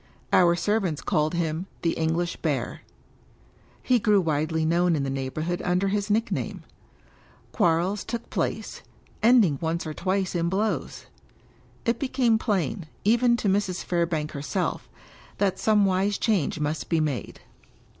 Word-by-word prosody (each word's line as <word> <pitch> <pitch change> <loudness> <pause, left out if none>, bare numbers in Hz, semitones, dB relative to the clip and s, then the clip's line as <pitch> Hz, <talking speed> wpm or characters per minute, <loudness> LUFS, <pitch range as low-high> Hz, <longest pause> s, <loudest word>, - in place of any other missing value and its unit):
Our 175 -1 +5
servants 185 -3 0
called 155 +2 0
him 170 +1 -2
" - - -32
the 165 - +2
English 165 +2 -1
Bear." - - -2 1.0
He 250 -2 +3
grew 210 -2 +4
widely 160 -1 0
known 170 +1 +2
in 145 - -1
the 135 - -2
neighborhood 155 +6 -3
under 180 +2 +1
his 205 +1 -1
nickname. 225 +3 -1 0.9
Quarrels 180 0 +1
took 235 -1 -5
place, - - -3 0.4
ending 215 - +5
once 165 +1 -1
or 155 - -4
twice 190 +2 -1
in 170 -1 0
blows. 210 +4 -2 0.8
It 235 0 +1
became 255 -5 +2
plain, 180 - -1 0.2
even 235 +3 +4
to 215 - -2
Mrs. 190 -2 0
Fairbank 165 -3 -1
herself, 140 -2 -3 0.5
that 195 -2 0
some 210 -2 +3
wise 195 +2 +1
change 195 - 0
must 150 +1 -2
be 165 - +2
made. 150 -5 -3
180 Hz, 140 wpm, -26 LUFS, 160-205 Hz, 1.0 s, Our